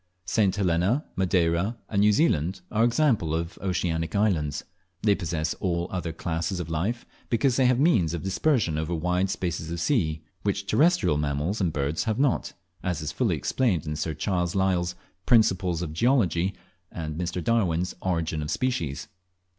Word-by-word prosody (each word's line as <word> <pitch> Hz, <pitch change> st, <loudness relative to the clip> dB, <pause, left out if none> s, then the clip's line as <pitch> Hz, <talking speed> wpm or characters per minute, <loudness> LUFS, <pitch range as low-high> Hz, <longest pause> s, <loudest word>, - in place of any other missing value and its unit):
St. 100 Hz, -1 st, +2 dB
Helena, 95 Hz, -, +1 dB
Madeira, 90 Hz, +3 st, +1 dB
and 100 Hz, -, -1 dB
New 105 Hz, +1 st, +5 dB
Zealand 95 Hz, -, +1 dB
are 110 Hz, +1 st, +2 dB
examples 120 Hz, -, +2 dB
of 85 Hz, +3 st, -4 dB
oceanic 85 Hz, -3 st, -1 dB
islands. 90 Hz, -9 st, +1 dB, 0.4 s
They 105 Hz, -1 st, +5 dB
possess 80 Hz, -4 st, -2 dB
all 85 Hz, -2 st, -1 dB
other 90 Hz, -3 st, -3 dB
classes 80 Hz, +2 st, -3 dB
of 85 Hz, -2 st, -5 dB
life, 100 Hz, +10 st, -1 dB, 0.2 s
because 125 Hz, +2 st, +2 dB
these 130 Hz, -2 st, +4 dB
have 125 Hz, 0 st, +3 dB
means 100 Hz, -, +3 dB
of 85 Hz, -, -5 dB
dispersion 95 Hz, -, +1 dB
over 80 Hz, +2 st, -2 dB
wide 90 Hz, +3 st, 0 dB
spaces 85 Hz, -4 st, -3 dB
of 85 Hz, 0 st, -3 dB
sea, 80 Hz, -, 0 dB, 0.2 s
which 100 Hz, -1 st, -1 dB
terrestrial 155 Hz, -, +3 dB
mammals 75 Hz, +8 st, -1 dB
and 90 Hz, -3 st, +1 dB
birds 75 Hz, +6 st, -1 dB
have 110 Hz, -1 st, 0 dB
not, 140 Hz, -1 st, +1 dB, 0.3 s
as 90 Hz, -4 st, -2 dB
is 75 Hz, -, -3 dB
fully -, -, +1 dB
explained 100 Hz, -, 0 dB
in 75 Hz, 0 st, -3 dB
Sir 80 Hz, +1 st, -3 dB
Charles 90 Hz, +2 st, -1 dB
Lyell's 90 Hz, -2 st, +1 dB, 0.3 s
"Principles 95 Hz, -7 st, +3 dB
of 80 Hz, -3 st, -5 dB
Geology," 95 Hz, -, +2 dB, 0.4 s
and 80 Hz, -2 st, -5 dB
Mr. 90 Hz, +1 st, -3 dB
Darwin's 90 Hz, -6 st, +1 dB
"Origin 80 Hz, -4 st, -1 dB
of 75 Hz, -, -4 dB
Species." 85 Hz, -, -2 dB
90 Hz, 160 wpm, -26 LUFS, 80-105 Hz, 0.4 s, New